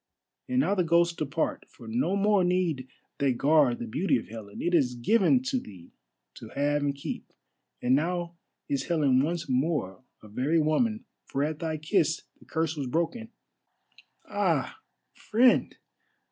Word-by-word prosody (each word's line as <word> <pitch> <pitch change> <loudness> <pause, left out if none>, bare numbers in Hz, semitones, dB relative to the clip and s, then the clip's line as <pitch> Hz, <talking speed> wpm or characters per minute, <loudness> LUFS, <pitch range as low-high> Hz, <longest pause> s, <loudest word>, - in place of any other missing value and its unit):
And 255 +1 +2
now 200 - +1
the 185 -3 +2
ghosts 170 0 +3
depart, 155 0 -2
for 115 - -14
no 130 - 0
more 200 -1 +3
need 175 -7 0 0.3
they 140 -2 +2
guard 140 -1 +3
the - - -5
beauty 145 - +1
of 115 - -7
Helen. 105 -2 -9
It 175 - -1
is 130 -7 +3
given 225 - +3
to 265 -1 0
thee 90 - -13 0.5
to - - -9
have 145 +1 +1
and 140 -1 0
keep, 140 - -6 0.5
and 125 - +3
now 170 +4 0 0.3
is 140 - -1
Helen 145 -6 +3
once 165 +2 -2
more 130 - -1 0.2
a - - -11
very 135 +10 +1
woman, 215 +9 +1 0.2
for 140 - -1
at 155 0 -2
thy 160 -2 -2
kiss 155 +1 +1 0.2
the - - -19
curse 160 0 -1
was 140 -3 -3
broken. 170 - -2 1.0
Ah, - - 0 0.3
friend! 240 +3 +2
155 Hz, 160 wpm, -28 LUFS, 130-175 Hz, 1.0 s, ghosts